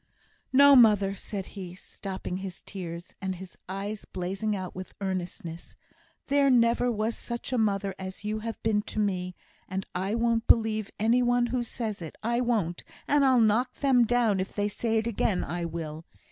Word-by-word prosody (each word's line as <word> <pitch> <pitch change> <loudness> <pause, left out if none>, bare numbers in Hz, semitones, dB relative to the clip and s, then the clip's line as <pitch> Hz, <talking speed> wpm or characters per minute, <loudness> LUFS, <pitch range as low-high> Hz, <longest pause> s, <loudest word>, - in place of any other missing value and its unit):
"No, 280 +1 +8
mother," 210 -5 +6
said 195 0 -5
he, 185 -3 -7
stopping 185 -1 -6
his 190 -1 -7
tears, 175 -3 -7
and 190 -1 -2
his 185 0 -10
eyes 200 +2 -4
blazing 190 +4 -2
out 185 -2 -5
with 185 0 -8
earnestness; 175 -3 -5 0.5
"there 280 0 +3
never 240 0 +4
was 220 +1 -1
such 235 +1 -5
a - - +2
mother 200 -2 +1
as 190 +1 -7
you 215 +1 -1
have 225 +1 -5
been 215 -2 +2
to 210 - -8
me, 185 -4 -1 0.3
and 190 +1 -3
I 190 +4 -1
won't 230 -1 +1
believe 220 -2 +3
any 230 +4 +3
one 245 0 +3
who 250 - +1
says 225 -4 -4
it. 160 - -7
I 235 +2 +1
won't; 215 -9 0 0.2
and 290 0 +4
I'll 260 -2 +5
knock 225 +3 +2
them 265 -4 +4
down 230 -4 +2
if 185 - -4
they 205 0 +1
say 225 +2 -1
it 220 - 0
again, 215 -4 0
I 175 0 -3
will!" 160 -1 -6
210 Hz, 180 wpm, -28 LUFS, 185-235 Hz, 0.5 s, No